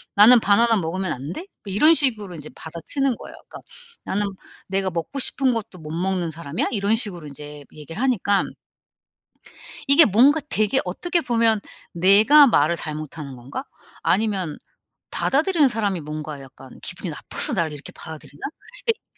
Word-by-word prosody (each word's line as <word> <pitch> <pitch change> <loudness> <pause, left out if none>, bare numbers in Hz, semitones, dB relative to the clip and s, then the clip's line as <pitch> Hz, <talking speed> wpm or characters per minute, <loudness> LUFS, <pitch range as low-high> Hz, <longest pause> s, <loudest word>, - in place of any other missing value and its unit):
"나는 230 +4 +8
바나나 225 +2 +3
먹으면 185 +2 -2
안 140 +7 -5
돼?" - - -6 0.2
뭐 195 - -5
이런 305 +11 +6
식으로 220 - +1
이제 155 -1 -9
받아치는 230 - -3
거예요. - - -11
그러니까 - - -10 0.5
"나는 205 +2 -1 0.4
내가 190 0 -1
먹고 175 +11 -5
싶은 265 -1 +2
것도 205 -5 -6
못 155 -1 -9
먹는 175 0 -2
사람이야?" 160 0 -3
이런 205 -1 +1
식으로 190 - -4
인제 145 0 -10
얘기를 160 +7 -9
하니까 205 -6 +1 1.4
이게 280 +4 +8
뭔가 265 +10 +4
되게 215 +5 +2
어떻게 340 - -1
보면 230 -4 +2 0.3
'내가 205 - +7
말을 170 - +2
잘못하는 155 -3 -7
건가? 135 - -7 0.4
아니면 195 -7 0 0.5
받아들이는 305 +1 +2
사람이 205 -7 -1
뭔가 150 -1 -7
약간 135 -1 -14
기분이 - - -5
나빠서 - - -1
나를 165 -2 -1
이렇게 145 -1 -10
받아들이나?' 155 -2 -11 0.4
그러니까 460 -2 +1
195 Hz, 360 characters per minute, -22 LUFS, 160-235 Hz, 1.4 s, 나는